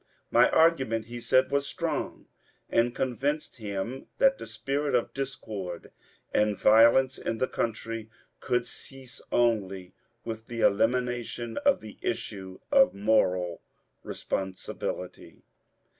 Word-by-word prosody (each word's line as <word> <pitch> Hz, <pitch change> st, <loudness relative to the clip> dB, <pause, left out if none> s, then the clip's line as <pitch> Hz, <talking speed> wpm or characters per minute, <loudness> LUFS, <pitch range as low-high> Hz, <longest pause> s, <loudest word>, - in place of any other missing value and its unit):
My -, -, +6 dB
argument, 130 Hz, -9 st, +3 dB
he 120 Hz, +1 st, -7 dB
said, 130 Hz, +3 st, +3 dB
was 140 Hz, 0 st, +1 dB
strong -, -, -3 dB, 0.5 s
and 120 Hz, +1 st, +2 dB
convinced 135 Hz, +4 st, -2 dB
him 110 Hz, +4 st, -5 dB
that 270 Hz, 0 st, +4 dB
the -, -, -7 dB
spirit 135 Hz, +6 st, -1 dB
of 120 Hz, -, 0 dB
discord 105 Hz, -10 st, -5 dB, 0.4 s
and 105 Hz, -1 st, +2 dB
violence 115 Hz, +4 st, +5 dB
in 115 Hz, -, -2 dB
the 130 Hz, -, +1 dB
country 115 Hz, -1 st, -3 dB, 0.3 s
could 125 Hz, -1 st, 0 dB
cease 130 Hz, -2 st, -11 dB
only 95 Hz, -6 st, +1 dB, 0.3 s
with 110 Hz, -1 st, -6 dB
the 115 Hz, -1 st, -4 dB
elimination 120 Hz, +1 st, +1 dB
of -, -, +3 dB
the 110 Hz, -1 st, -11 dB
issue 95 Hz, -5 st, -4 dB
of 275 Hz, -1 st, +5 dB
moral 90 Hz, -4 st, +1 dB, 0.4 s
responsibility. 95 Hz, -1 st, -5 dB
115 Hz, 115 wpm, -28 LUFS, 105-130 Hz, 0.5 s, My